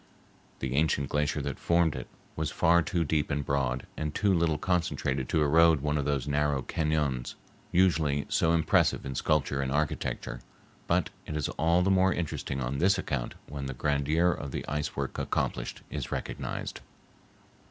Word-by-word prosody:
The 65 Hz, -1 st, -2 dB
ancient 70 Hz, -1 st, +1 dB
glacier 75 Hz, -1 st, 0 dB
that -, -, -4 dB
formed 85 Hz, -2 st, +2 dB
it -, -, -6 dB, 0.3 s
was 80 Hz, -1 st, -1 dB
far 85 Hz, +2 st, +4 dB
too 85 Hz, +1 st, 0 dB
deep 75 Hz, -1 st, 0 dB
and 70 Hz, -2 st, -1 dB
broad 65 Hz, -2 st, 0 dB
and 75 Hz, -1 st, -3 dB
too 100 Hz, -2 st, +3 dB
little 85 Hz, -3 st, +2 dB
concentrated 80 Hz, -7 st, -1 dB
to 80 Hz, -2 st, +2 dB
erode 80 Hz, 0 st, +5 dB
one 75 Hz, +1 st, 0 dB
of 70 Hz, -2 st, 0 dB
those 70 Hz, -2 st, -1 dB
narrow 75 Hz, -2 st, +1 dB
cañons, 75 Hz, -6 st, -1 dB, 0.4 s
usually 80 Hz, -6 st, +2 dB
so 80 Hz, -, +2 dB
impressive 85 Hz, -1 st, +2 dB
in 65 Hz, -, -4 dB
sculpture 70 Hz, 0 st, +1 dB
and 65 Hz, -1 st, -2 dB
architecture, 70 Hz, -4 st, -2 dB, 0.5 s
but -, -, +1 dB, 0.2 s
it 75 Hz, -, -3 dB
is 75 Hz, -, -1 dB
all 85 Hz, +3 st, +2 dB
the 95 Hz, -, +2 dB
more 95 Hz, 0 st, +4 dB
interesting 75 Hz, -5 st, -3 dB
on 65 Hz, +2 st, -2 dB
this 95 Hz, +3 st, +4 dB
account 65 Hz, -9 st, -3 dB
when 70 Hz, -2 st, -5 dB
the 65 Hz, -, -5 dB
grandeur 75 Hz, +6 st, +2 dB
of 75 Hz, -3 st, -4 dB
the -, -, -5 dB
ice 75 Hz, 0 st, -2 dB
work 70 Hz, -1 st, -3 dB
accomplished -, -, -2 dB
is -, -, -4 dB
recognized. -, -, -4 dB
75 Hz, 170 wpm, -29 LUFS, 70-80 Hz, 0.5 s, erode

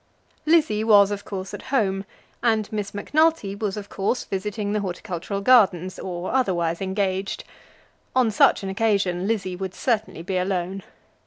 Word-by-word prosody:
Lizzie 305 Hz, -10 st, +3 dB
was 205 Hz, -2 st, +6 dB
of 200 Hz, 0 st, -4 dB
course 190 Hz, -2 st, -6 dB
at -, -, -6 dB
home, 200 Hz, -7 st, +1 dB, 0.4 s
and 220 Hz, -2 st, +1 dB
Miss 210 Hz, -2 st, -3 dB
Macnulty 300 Hz, 0 st, +1 dB
was 205 Hz, 0 st, -3 dB
of 205 Hz, -1 st, -6 dB
course 200 Hz, +6 st, -1 dB
visiting 205 Hz, +1 st, -3 dB
the 210 Hz, -, +1 dB
Horticultural 190 Hz, 0 st, -4 dB
Gardens 190 Hz, -6 st, +4 dB
or 180 Hz, -1 st, -4 dB
otherwise 175 Hz, -10 st, 0 dB
engaged. 190 Hz, 0 st, -2 dB, 0.7 s
On 250 Hz, -4 st, +3 dB
such 205 Hz, -, +4 dB
an 195 Hz, -, -3 dB
occasion 195 Hz, -3 st, +1 dB
Lizzie 195 Hz, -5 st, -1 dB
would 190 Hz, 0 st, -5 dB
certainly 220 Hz, -8 st, -1 dB
be 185 Hz, +1 st, -2 dB
alone. 185 Hz, +1 st, -2 dB
200 Hz, 150 wpm, -24 LUFS, 190-215 Hz, 0.7 s, was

